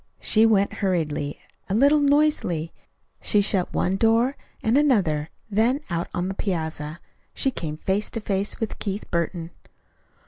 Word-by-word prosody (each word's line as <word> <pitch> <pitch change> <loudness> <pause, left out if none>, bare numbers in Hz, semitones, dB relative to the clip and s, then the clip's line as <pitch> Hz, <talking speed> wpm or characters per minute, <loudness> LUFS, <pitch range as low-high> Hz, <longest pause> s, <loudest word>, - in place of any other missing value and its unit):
She 220 +1 +4
went 200 -2 +2
hurriedly, 155 -6 -1 0.3
a 195 - 0
little 285 +6 +5
noisily. 285 - +2 0.5
She 210 - +2
shut 195 -3 +1
one 190 +2 0
door, 230 +5 +3 0.3
and 220 +2 +2
another; 190 - +2 0.2
then, 235 +7 +2
out 170 0 -1
on 175 +1 -2
the 190 - -2
piazza, 160 -5 -3 0.4
she 270 - +2
came 155 -9 -5
face 195 +5 -1
to - - -1
face 200 -1 -1
with 225 - -4
Keith 200 0 -4
Burton. 170 0 -2
195 Hz, 145 wpm, -24 LUFS, 170-225 Hz, 0.5 s, little